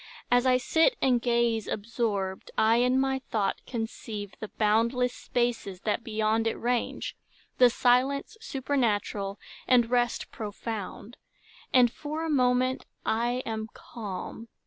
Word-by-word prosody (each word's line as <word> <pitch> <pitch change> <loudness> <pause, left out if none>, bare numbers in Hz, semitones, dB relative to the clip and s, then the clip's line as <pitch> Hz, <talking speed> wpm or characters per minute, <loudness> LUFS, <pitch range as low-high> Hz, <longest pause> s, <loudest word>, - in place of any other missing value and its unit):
As 245 +1 +4
I 255 0 +5
sit 325 - +3
And 250 -3 +3
gaze, 235 -2 +1
absorbed, 205 -3 -2
I 225 +1 +4
in 250 +2 +3
my 265 0 +1
thought 210 -6 -2
conceive 220 -4 -5
The 215 - -5
boundless 230 +4 +1
spaces 235 -6 -2
that 215 +2 -1
beyond 220 0 +1
it 225 - 0
range, 240 0 -2 0.4
The 250 -1 +8
silence 260 - +2
supernatural, 230 - -1 0.3
and 240 -2 +4
rest 240 -1 +1
Profound; 215 0 -6 0.5
and 245 -2 +5
for 305 +4 -4
a 320 - -1
moment 255 -1 +2 0.2
I 240 +3 0
am 220 -1 -3
calm. 215 0 -7
235 Hz, 125 wpm, -28 LUFS, 220-250 Hz, 0.5 s, The